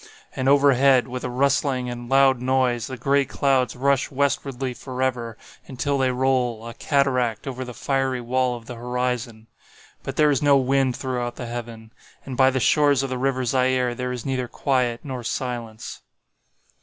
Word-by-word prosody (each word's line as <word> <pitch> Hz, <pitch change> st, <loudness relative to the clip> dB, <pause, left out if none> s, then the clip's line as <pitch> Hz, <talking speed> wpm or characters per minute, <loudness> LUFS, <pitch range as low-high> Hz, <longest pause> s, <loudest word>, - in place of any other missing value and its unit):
And 130 Hz, +1 st, 0 dB
overhead, 135 Hz, -2 st, +4 dB
with 125 Hz, 0 st, -6 dB
a 125 Hz, -, -2 dB
rustling 135 Hz, 0 st, +1 dB
and 120 Hz, 0 st, -6 dB
loud 135 Hz, -2 st, +4 dB
noise, 125 Hz, -3 st, +1 dB
the 130 Hz, -, -6 dB
gray 140 Hz, +3 st, +2 dB
clouds 135 Hz, -2 st, 0 dB
rush 135 Hz, +1 st, +1 dB
westwardly 135 Hz, -2 st, -1 dB
forever, 125 Hz, -3 st, -3 dB, 0.3 s
until 140 Hz, +1 st, -2 dB
they 130 Hz, -1 st, +2 dB
roll, 125 Hz, -3 st, 0 dB
a 115 Hz, -, -7 dB
cataract, 125 Hz, -5 st, 0 dB
over 130 Hz, -2 st, -4 dB
the 125 Hz, -2 st, -9 dB
fiery 135 Hz, -2 st, -1 dB
wall 125 Hz, +1 st, 0 dB
of 115 Hz, -, -14 dB
the 125 Hz, -, -7 dB
horizon. 125 Hz, -1 st, -3 dB, 0.6 s
But -, -, -6 dB
there 150 Hz, -1 st, +4 dB
is 140 Hz, -, +1 dB
no 145 Hz, -1 st, +5 dB
wind 135 Hz, -1 st, +1 dB
throughout 125 Hz, -2 st, -3 dB
the 125 Hz, -, -6 dB
heaven. 115 Hz, -1 st, -7 dB, 0.3 s
And 130 Hz, -, -6 dB
by 130 Hz, +1 st, +5 dB
the 130 Hz, 0 st, -1 dB
shores 145 Hz, +2 st, +3 dB
of 135 Hz, -, -4 dB
the 130 Hz, -, -2 dB
river 130 Hz, -1 st, 0 dB
Zaire 130 Hz, 0 st, +1 dB
there 125 Hz, +1 st, -4 dB
is 125 Hz, -2 st, -6 dB
neither 130 Hz, -2 st, -2 dB
quiet 125 Hz, -2 st, -1 dB
nor 130 Hz, -4 st, -6 dB
silence. 120 Hz, -2 st, -5 dB
130 Hz, 170 wpm, -23 LUFS, 120-135 Hz, 0.6 s, no